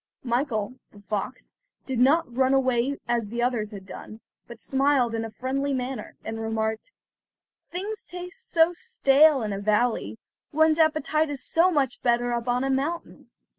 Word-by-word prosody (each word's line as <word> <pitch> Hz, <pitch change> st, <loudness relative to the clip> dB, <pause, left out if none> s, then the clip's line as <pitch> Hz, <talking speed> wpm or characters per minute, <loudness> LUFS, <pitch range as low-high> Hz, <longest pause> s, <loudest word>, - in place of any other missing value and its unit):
Michael, 240 Hz, -3 st, -1 dB, 0.2 s
the 205 Hz, -, -16 dB
fox, 210 Hz, +5 st, -5 dB, 0.3 s
did 260 Hz, -3 st, -2 dB
not 270 Hz, 0 st, +3 dB
run 265 Hz, +1 st, +3 dB
away 260 Hz, +1 st, +1 dB
as 235 Hz, -3 st, 0 dB
the 235 Hz, +3 st, -2 dB
others 235 Hz, -4 st, 0 dB
had 200 Hz, -3 st, -9 dB
done, 215 Hz, +2 st, -10 dB, 0.3 s
but 235 Hz, -1 st, -11 dB
smiled 270 Hz, -3 st, +2 dB
in 225 Hz, 0 st, -1 dB
a 225 Hz, -, -5 dB
friendly 270 Hz, +4 st, -2 dB
manner, 255 Hz, -3 st, -5 dB
and 225 Hz, 0 st, -4 dB
remarked: 220 Hz, -, -2 dB, 0.8 s
"Things 400 Hz, +4 st, -5 dB
taste 360 Hz, +7 st, -8 dB
so 330 Hz, 0 st, +4 dB
stale 305 Hz, -, +4 dB
in 210 Hz, -2 st, -2 dB
a 195 Hz, -, -3 dB
valley; 210 Hz, -, 0 dB, 0.3 s
one's 315 Hz, +1 st, +3 dB
appetite 310 Hz, -1 st, +2 dB
is 285 Hz, -2 st, -4 dB
so 340 Hz, +3 st, +3 dB
much 280 Hz, -7 st, 0 dB
better 240 Hz, 0 st, +1 dB
up 235 Hz, 0 st, -3 dB
on 245 Hz, +1 st, +1 dB
a 270 Hz, -, 0 dB
mountain." 290 Hz, +6 st, -3 dB
255 Hz, 165 wpm, -26 LUFS, 230-305 Hz, 0.8 s, so